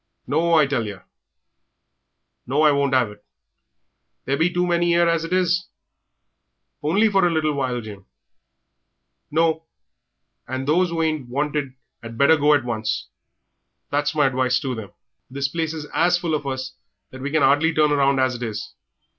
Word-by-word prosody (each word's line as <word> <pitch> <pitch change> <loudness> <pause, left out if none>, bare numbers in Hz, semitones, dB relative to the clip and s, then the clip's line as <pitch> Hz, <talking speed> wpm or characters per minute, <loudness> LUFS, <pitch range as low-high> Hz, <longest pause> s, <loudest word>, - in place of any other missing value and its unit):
"No, 165 +3 +1
I 155 -2 +5
tell 135 -5 -1
yer. 100 -3 -9 1.4
No, 140 +5 +1
I 150 - +6
won't 140 -1 +1
'ave 125 -5 +2
it! 105 0 -17 1.0
There 135 - 0
be 165 +4 +1
too 180 0 0
many 170 -1 +2
'ere 170 0 +4
as 165 -1 +1
it 165 - -6
is." 185 0 +1 1.1
"Only 180 +9 +2
a - - +4
little 165 -6 +2
while, 130 -3 -2
Jim." 100 -3 -11 1.2
"No. 160 +1 0 0.8
And 130 +1 -4
those 175 +4 +3
who 165 -1 -1
ain't 155 -6 -2
wanted 145 0 -2 0.3
'ad 115 -1 -9
better 140 +5 +5
go 150 0 +4
at 135 -4 -1
once 110 -3 -3 0.8
that's 145 +1 0
my 150 -2 +3
advice 130 -1 +1
to 130 -2 -3
them. 110 -4 -7 0.4
The 140 +1 -2
place 160 -1 -2
is 155 -2 -6
as 175 +1 +3
full 170 -2 -3
of 150 -2 -2
us 130 -1 -4 0.4
that 130 - -10
we 140 - -3
can 155 0 +1
'ardly 145 +4 +4
turn 150 -1 +2
round 140 -1 +2
as 130 0 +2
it 120 - -7
is. 110 -3 -5
145 Hz, 170 wpm, -22 LUFS, 130-165 Hz, 1.4 s, I